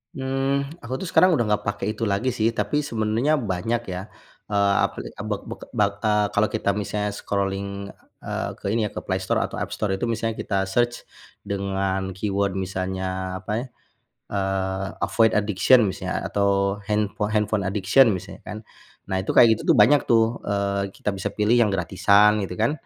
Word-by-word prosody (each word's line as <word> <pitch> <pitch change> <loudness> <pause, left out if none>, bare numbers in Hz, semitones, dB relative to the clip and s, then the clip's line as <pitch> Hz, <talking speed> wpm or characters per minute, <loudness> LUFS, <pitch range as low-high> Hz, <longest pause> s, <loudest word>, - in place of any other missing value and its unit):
Mmm, 135 +1 -1 0.2
aku 120 +2 -5
tuh 190 - -4
sekarang 185 +2 +5
udah 120 -4 +1
nggak 105 0 +1
pakai 105 -1 -2
itu 115 - -4
lagi 120 +7 0
sih 110 +1 +2
tapi 150 +5 -1
sebenarnya 115 +3 0 0.2
banyak 115 +7 -1
ya. 90 - -4 0.5
Eee, 100 -1 +3
apli - - -3 0.2
b - - -3 0.2
b - - -7 0.3
b - - 0
eee, 105 +1 0
kalau 105 +1 +3
kita 110 -2 -1
misalnya 105 0 -2
scrolling, 100 -1 -2 0.5
eee, - - -3
ke - - -14
ini 115 - +1
ya - - -4
ke - - -5
Play 95 -1 0
Store - - +1
atau - - -3
App - - -4
Store 95 -2 -1
itu 95 - -6
misalnya 115 0 -2
kita 100 - -2
search 120 +4 0 0.4
dengan 95 -1 -1
keyword 100 0 -1
misalnya 95 0 -3
apa 100 +2 -7
ya, - - -8 0.7
eee, 95 0 -1 0.2
avoid 115 -1 +3
addiction 105 +3 +4
misalnya 95 - -3
atau 100 0 +1
handpho 105 0 -1
handphone 105 -1 +1
addiction 100 +6 +4
misalnya 95 0 -5
kan. 105 - -7 0.5
Nah 95 - -2
itu - - -4
kayak 115 -2 +7
gitu - - -8
tuh - - +5
banyak 135 +8 +6
tuh, 115 0 +2
eee, 100 -1 -1
kita 100 +1 -3
bisa 95 - -3
pilih 105 +3 +1
yang 105 - +2
gratisan 100 +3 +3
gitu 90 -2 -5
kan, 115 +6 +2
105 Hz, 180 wpm, -24 LUFS, 95-110 Hz, 0.7 s, kayak